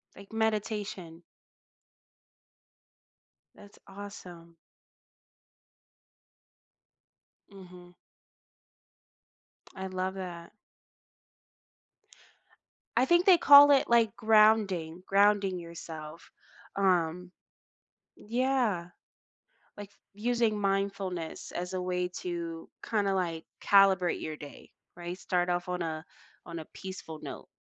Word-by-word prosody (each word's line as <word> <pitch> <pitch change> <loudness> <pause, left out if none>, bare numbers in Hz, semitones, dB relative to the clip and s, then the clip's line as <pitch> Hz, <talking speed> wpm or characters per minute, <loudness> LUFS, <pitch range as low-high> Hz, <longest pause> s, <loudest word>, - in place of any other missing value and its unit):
Like 200 +3 -14
meditation. 210 -6 -3 2.3
That's 205 0 -16
awesome. 180 -4 -11 2.9
Mhm. 180 -2 -14 1.8
I 190 0 -5
love 185 0 -3
that. 175 -3 -7 2.5
I 255 - +5
think 345 +4 +3
they 370 -3 +7
call 285 -2 +9
it 275 -3 +3
like 230 -3 +3
grounding. 215 -6 +3
Grounding 200 -2 +3
yourself. 165 -2 -9 0.5
Um 180 -2 +1 0.9
yeah. 235 -7 -1 0.9
Like 205 -1 -9 0.2
using 230 -1 0
mindfulness 195 -4 -2
as 180 +1 -4
a 185 - -2
way 180 0 -1
to 170 -2 -5 0.2
kinda 200 -3 0
like 170 -3 -2 0.2
calibrate 195 -3 +4
your 155 -1 -5
day, 145 -1 -12 0.3
right? 175 +1 -6
Start 180 0 -1
off 175 0 -1
on 180 0 -3
a 160 0 -4 0.4
on 170 -1 -6
a 160 - -8
peaceful 185 -5 -8
note. - - -8
185 Hz, 85 wpm, -29 LUFS, 175-205 Hz, 2.9 s, call